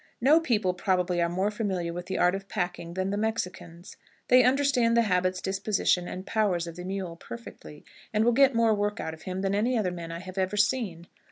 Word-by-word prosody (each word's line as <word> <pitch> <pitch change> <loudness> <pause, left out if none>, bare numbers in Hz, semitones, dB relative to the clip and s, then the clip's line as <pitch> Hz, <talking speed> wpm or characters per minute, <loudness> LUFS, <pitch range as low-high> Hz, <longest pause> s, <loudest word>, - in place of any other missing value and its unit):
No 290 +7 +5
people, 215 - +1
probably, 180 -2 0
are 170 - +1
more 190 +4 0
familiar 190 -6 -2
with 175 +1 -6
the 190 - -2
art 180 0 +3
of 195 0 -5
packing 175 -3 -3
than 190 +1 -1
the 205 - -1
Mexicans. 180 -5 -4 0.3
They 255 0 +7
understand 255 -3 +3
the 235 - +5
habits, 185 -2 0
disposition, 190 -2 0
and 185 +1 -6
powers 195 -6 0
of 170 -1 -8
the 180 0 -8
mule 190 -3 -4
perfectly, 170 -6 -11 0.3
and 215 +1 +2
will 240 - +5
get 270 +1 +4
more 230 -1 +4
work 205 +1 -1
out 160 - -4
of 160 - -12
him 185 +1 -3
than 195 0 0
any 235 +5 +1
other 195 -5 0
men 170 -2 -7
I 165 - -5
have 185 +2 -7
ever 190 +2 -1
seen. 205 -6 0
195 Hz, 215 wpm, -27 LUFS, 180-220 Hz, 0.3 s, They